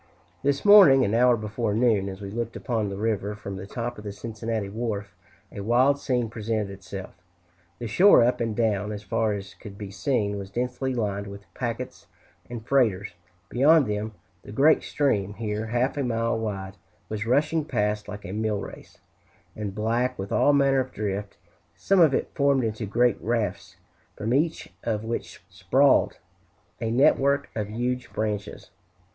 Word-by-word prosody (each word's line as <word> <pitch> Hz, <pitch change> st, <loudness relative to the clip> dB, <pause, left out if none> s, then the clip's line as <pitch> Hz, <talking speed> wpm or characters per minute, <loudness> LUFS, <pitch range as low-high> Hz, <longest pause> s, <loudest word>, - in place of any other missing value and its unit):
This 140 Hz, +3 st, 0 dB
morning, 195 Hz, -11 st, +8 dB
an 100 Hz, -, -1 dB
hour 120 Hz, +1 st, +4 dB
before 110 Hz, 0 st, -2 dB
noon, 110 Hz, -4 st, +2 dB
as 95 Hz, +1 st, -8 dB
we 100 Hz, -1 st, -6 dB
looked 115 Hz, +1 st, -4 dB
upon 110 Hz, -4 st, -2 dB
the 100 Hz, -, -5 dB
river 105 Hz, -1 st, -1 dB
from 100 Hz, -2 st, -7 dB
the 95 Hz, +1 st, -7 dB
top 120 Hz, +1 st, -5 dB
of -, -, -10 dB
the 105 Hz, -, -5 dB
Cincinnati 110 Hz, 0 st, -4 dB
wharf, 105 Hz, -1 st, -4 dB, 0.4 s
a -, -, -8 dB
wild 125 Hz, +6 st, +3 dB
scene 125 Hz, -4 st, 0 dB
presented 110 Hz, -2 st, -3 dB
itself. 95 Hz, 0 st, -8 dB, 0.6 s
The 120 Hz, -, -6 dB
shore 175 Hz, -, +6 dB
up 125 Hz, +1 st, +1 dB
and 115 Hz, -2 st, -1 dB
down, 105 Hz, -2 st, 0 dB
as 105 Hz, -1 st, -6 dB
far 105 Hz, +2 st, 0 dB
as 100 Hz, -1 st, -7 dB
could 100 Hz, -2 st, -11 dB
be 100 Hz, -2 st, -7 dB
seen, 105 Hz, -2 st, -1 dB
was 95 Hz, -1 st, -7 dB
densely 125 Hz, +4 st, -2 dB
lined 100 Hz, -3 st, -2 dB
with 100 Hz, 0 st, -10 dB
packets 120 Hz, +1 st, -5 dB, 0.4 s
and 120 Hz, -2 st, -7 dB
freighters; 110 Hz, -9 st, +1 dB, 0.3 s
beyond 145 Hz, +6 st, +4 dB
them, 105 Hz, 0 st, -3 dB, 0.3 s
the -, -, -11 dB
great 145 Hz, +8 st, +4 dB
stream, 105 Hz, -9 st, 0 dB
here 105 Hz, 0 st, -3 dB
half 120 Hz, +4 st, 0 dB
a 140 Hz, -, 0 dB
mile 115 Hz, -2 st, 0 dB
wide, 100 Hz, -3 st, -5 dB, 0.3 s
was 110 Hz, 0 st, -4 dB
rushing 150 Hz, +5 st, +2 dB
past 105 Hz, -6 st, -1 dB
like 105 Hz, 0 st, -8 dB
a 90 Hz, -, -6 dB
mill 105 Hz, 0 st, -1 dB
race, -, -, -10 dB, 0.6 s
and 105 Hz, -2 st, -5 dB
black 120 Hz, +4 st, 0 dB
with 95 Hz, +1 st, -6 dB
all 145 Hz, -, +4 dB
manner 140 Hz, -1 st, +3 dB
of 130 Hz, 0 st, -2 dB
drift, 100 Hz, -1 st, -4 dB, 0.4 s
some 195 Hz, -1 st, +2 dB
of 160 Hz, -4 st, +6 dB
it -, -, -1 dB
formed 140 Hz, -2 st, +2 dB
into 110 Hz, -1 st, -3 dB
great 120 Hz, +4 st, +2 dB
rafts 100 Hz, -6 st, -2 dB, 0.4 s
from 110 Hz, +3 st, -2 dB
each 160 Hz, +4 st, 0 dB
of 110 Hz, -2 st, -1 dB
which 115 Hz, +1 st, -5 dB
sprawled -, -, +2 dB, 0.6 s
a 115 Hz, -, -1 dB
network 140 Hz, +3 st, +3 dB
of 105 Hz, -2 st, -2 dB
huge 125 Hz, +3 st, -3 dB
branches. 105 Hz, -2 st, -4 dB
110 Hz, 170 wpm, -25 LUFS, 105-125 Hz, 0.6 s, morning